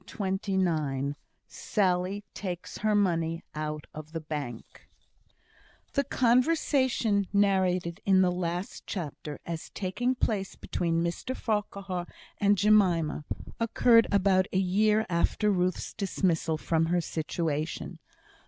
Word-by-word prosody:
CHAPTER - - -12 0.4
XXIX 150 -7 0 0.3
Sally 190 0 0
Takes 180 -3 -5
Her 215 0 +2
Money 165 -4 +1
Out 150 0 -4
of 155 +1 -9
the 165 - -2
Bank 145 -7 -7 1.0
The 280 - +2
conversation 250 - +2
narrated 190 -2 +2
in 190 -1 +5
the 180 - +3
last 175 +1 -4
chapter 150 -5 -5
as 165 -2 -5
taking 245 +7 -1
place 200 -6 -1
between 165 -1 -1
Mr 175 +9 -3
Farquhar 200 -4 -2 0.3
and 205 0 +4
Jemima, 180 -7 +3 0.3
occurred 230 0 +4
about 190 -1 +3
a - - 0
year 210 +4 +3
after 185 +4 +1
Ruth's 180 -1 -1
dismissal 175 -5 0
from 165 +1 +1
her 175 +1 +2
situation. 160 -1 -3
185 Hz, 115 wpm, -28 LUFS, 165-205 Hz, 1.0 s, in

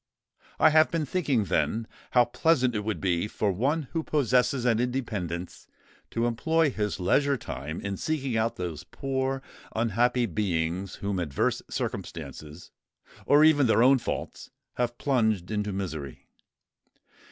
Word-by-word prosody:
I - - +6
have 155 0 +5
been 165 -2 -1
thinking, 145 - +1
then, 110 +3 0 0.2
how 125 -1 +5
pleasant 125 0 +2
it 105 - -1
would 110 0 -2
be 90 0 0
for 105 -1 -1
one 140 - 0
who 165 - -1
possesses 130 -4 +1
an 115 -2 +3
independence, 105 -9 -3 0.4
to 115 +1 -1
employ 160 +6 +2
his 105 -4 -2
leisure 140 +10 +2
time 80 - -6
in 100 -1 -3
seeking 140 -6 -2
out 110 +1 +1
those 85 -4 -5
poor, 135 0 -2 0.3
unhappy 120 +2 +2
beings 90 -2 -2
whom 100 -2 -2
adverse 75 -6 0
circumstances, 75 +3 -6 0.6
or 145 +1 +6
even 145 -4 +5
their 115 +1 +4
own 130 +1 +6
faults, - - -5 0.2
have 120 -1 -2
plunged 110 -9 +1
into 105 -1 -1
misery. 80 -9 -5
115 Hz, 140 wpm, -27 LUFS, 95-135 Hz, 0.6 s, I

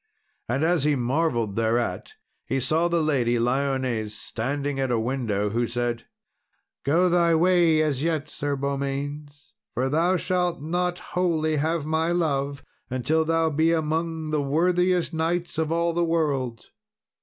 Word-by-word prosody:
And 135 +5 0
as 165 -3 +2
he 150 0 +3
marvelled 120 -4 0
thereat, 115 -4 -1 0.3
he 135 - 0
saw 160 +6 +1
the 170 -2 +1
Lady 125 -6 +1
Lyones 125 -3 0
standing 140 +7 -3
at 135 -1 0
a 120 - +1
window, 110 -4 -1
who 120 +2 0
said, 120 0 -3 0.8
"Go 165 +6 +3
thy 170 -1 +3
way 170 -2 +4
as 140 -4 -1
yet, 155 -2 -1
Sir 145 -1 -3
Beaumains, 140 +1 -4 0.2
for 130 +2 0
thou 170 +6 +2
shalt 180 -1 0
not 175 +4 -1 0.2
wholly 160 -4 +1
have 160 +1 0
my 160 +2 0
love 140 -5 -1 0.3
until 130 +6 +1
thou 165 0 +1
be 160 +3 +2
among 160 0 -1
the 150 -1 +1
worthiest 175 +4 +1
knights 170 +1 -1
of 160 0 0
all 170 0 +1
the 175 +1 +1
world. 145 -8 -1
150 Hz, 145 wpm, -25 LUFS, 130-165 Hz, 0.8 s, way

